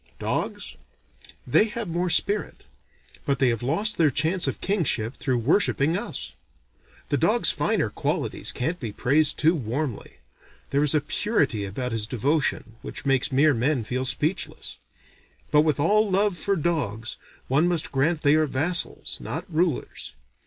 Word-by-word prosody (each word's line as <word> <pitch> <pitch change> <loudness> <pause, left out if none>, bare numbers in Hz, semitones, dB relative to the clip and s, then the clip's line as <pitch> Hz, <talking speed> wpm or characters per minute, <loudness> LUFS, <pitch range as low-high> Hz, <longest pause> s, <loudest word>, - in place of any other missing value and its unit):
Dogs? - - -3 0.7
They 125 - +4
have 225 0 -4
more 175 +2 -1
spirit. 200 +5 0 0.6
But 140 -1 0
they 130 -1 +3
have 115 -2 -1
lost 185 - 0
their 160 -3 +5
chance 160 +7 +2
of - - -3
kingship 140 - 0
through 130 -3 0
worshipping 150 - +2
us. - - -5 0.8
The - - +1
dog's - - +3
finer - - 0
qualities - - -2
can't 165 +8 -2
be 115 -7 -5
praised 145 +7 +2
too 160 +2 +4
warmly; 130 - -4 0.6
there 140 +1 +2
is 150 +1 +2
a 150 - +3
purity 145 - 0
about 125 +6 -4
his 110 -2 -2
devotion 125 -2 -1
which - - -7
makes 135 +1 +1
mere 145 +3 +4
men 125 +1 +1
feel 130 +4 -2
speechless: 150 +7 -3 0.7
but 150 - +6
with 150 -2 +1
all 210 +7 +3
love 195 0 +2
for 200 +4 -1
dogs, 140 - -2 0.3
one 145 +6 +3
must 175 -3 -1
grant 150 +4 +1
they 145 0 +4
are 155 0 +3
vassals, 160 +6 -1
not 165 +3 -4
rulers. 165 -3 -1
150 Hz, 150 wpm, -25 LUFS, 130-170 Hz, 0.8 s, but